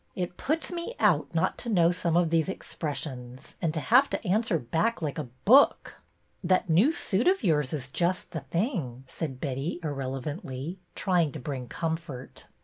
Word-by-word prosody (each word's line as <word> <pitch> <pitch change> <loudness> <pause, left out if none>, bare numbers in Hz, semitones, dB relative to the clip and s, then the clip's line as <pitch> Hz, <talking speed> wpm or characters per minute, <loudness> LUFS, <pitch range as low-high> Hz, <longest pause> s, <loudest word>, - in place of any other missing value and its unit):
It 180 -1 -3
puts 315 +5 -1
me 350 +7 -4
out - - +3
not - - +1
to 240 - -3
know 175 -5 +4
some 175 -2 0
of 170 -2 +2
these 165 +1 +2
expressions, 135 -7 -6
and 165 -3 +1
to - - 0
have 255 - +5
to - - -3
answer 210 -1 +2
back 165 - 0
like 155 -2 -3
a 140 -5 -5 0.2
book." 270 +7 +5 0.2
'' - - -42 0.2
That 185 -1 +2
new 200 - +5
suit 235 - 0
of 375 -6 +3
yours 150 -8 +2
is 140 -5 -2
just 175 +6 -1
the - - -3
thing," 165 - -2
said 135 -4 -5
Betty, 140 +5 -3
irrelevantly, 140 - -4 0.2
trying 175 -6 +2
to 155 - -6
bring 130 -2 -5
comfort. 160 -4 -5
165 Hz, 175 wpm, -28 LUFS, 140-190 Hz, 0.2 s, have